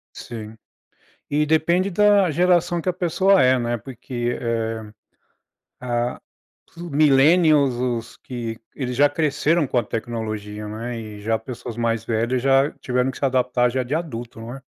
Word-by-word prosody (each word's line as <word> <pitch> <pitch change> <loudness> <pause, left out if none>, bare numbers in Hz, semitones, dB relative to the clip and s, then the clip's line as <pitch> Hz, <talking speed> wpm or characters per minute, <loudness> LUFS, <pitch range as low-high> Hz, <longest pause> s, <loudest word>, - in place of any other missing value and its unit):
Sim, 110 -2 -8 0.7
e 150 +1 +1
depende 170 +5 +2
da 205 0 +4
geração 175 +1 +2
que 185 - -1
a - - 0
pessoa 185 +1 +3
é, 130 0 +4
né. 120 -1 -1
Porque, 120 +1 -4
eh 115 -2 -3 0.9
ah, 120 -1 -2 0.5
plu 170 0 -8
millennials 150 0 +4
os 120 -2 -3
que 115 -3 -6 0.2
eles 125 -3 -4
já 145 +2 +5
cresceram 155 +1 +1
com 125 - 0
a - - +2
tecnologia, 110 -2 -5
né. 115 +3 -5
E 105 -2 -9
já 110 +2 0
pessoas 120 0 -8
mais 115 -1 -1
velhas 120 +2 0
já 135 +2 +4
tiveram 125 +1 0
que - - -10
se - - -2
adaptar 125 -2 +2
já 130 +1 -1
de 125 +4 -3
adulto 120 -9 -5
não 115 +2 -7
é? 135 - -10
125 Hz, 160 wpm, -22 LUFS, 115-150 Hz, 0.9 s, já